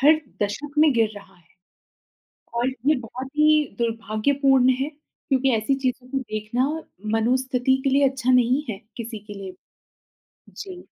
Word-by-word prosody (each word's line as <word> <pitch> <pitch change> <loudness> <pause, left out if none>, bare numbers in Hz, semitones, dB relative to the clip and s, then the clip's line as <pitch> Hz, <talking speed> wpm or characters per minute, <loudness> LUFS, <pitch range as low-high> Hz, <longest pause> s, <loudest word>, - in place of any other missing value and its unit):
हर 305 +3 +6 0.2
दशक 280 +9 -3
में 305 -2 +6
गिर 225 -3 +2
रहा 200 0 -13
है। 175 - -26 1.1
और 240 +2 +2
ये 265 +3 +1
बहुत 255 +3 -7
ही 305 0 +5
दुर्भाग्यपूर्ण 240 +4 +2
है, 275 - 0 0.4
क्योंकि 270 -1 +2
ऐसी 220 +5 +1
चीज़ों 255 -1 -2
को 270 +1 -1
देखना 235 +1 -2 0.5
मनोस्थिति 255 +2 +2
के 275 - +2
लिए 275 +1 +4
अच्छा 260 -1 -1
नहीं 250 +3 +3
है 200 -2 -6 0.2
किसी 230 -2 -6
के 210 - -8
लिए। 190 -2 -7 1.0
जी। 370 -3 -9
255 Hz, 150 wpm, -24 LUFS, 225-275 Hz, 1.1 s, हर